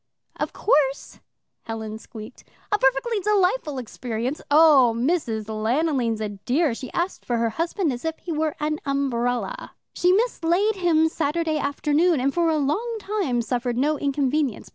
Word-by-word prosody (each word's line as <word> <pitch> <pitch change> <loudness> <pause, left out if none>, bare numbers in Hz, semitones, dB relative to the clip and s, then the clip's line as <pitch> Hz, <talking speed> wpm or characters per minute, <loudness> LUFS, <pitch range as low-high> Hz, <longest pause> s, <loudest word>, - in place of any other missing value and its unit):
"Of - - -2
course," 285 - 0 0.5
Helen 220 -1 -5
squeaked. 220 -2 -11 0.3
"A 415 - +2
perfectly 270 - +2
delightful 385 - +1
experience. 245 +2 -4
Oh, 285 -6 +6
Mrs. 240 -5 0
Lanoline's 230 +2 0
a 215 - -2
dear 245 - 0
she 250 +2 -7
asked 350 +3 -2
for 235 -1 0
a 225 - 0
husband 330 - -1
as 240 - -7
if 320 0 -2
he 350 - -7
was 310 -1 0
an 305 +1 -1
umbrella. 275 - -2 0.2
She 360 - +2
mislaid 400 -1 +1
him 325 -3 +3
Saturday 320 0 -1
afternoon 295 +3 +1
and 270 +2 0
for 340 -1 +2
a 315 - +2
long 415 - -1
time 385 - -1
suffered 245 0 -2
no 295 +3 +1
inconvenience. 280 -2 -1
290 Hz, 150 wpm, -24 LUFS, 245-340 Hz, 0.5 s, Oh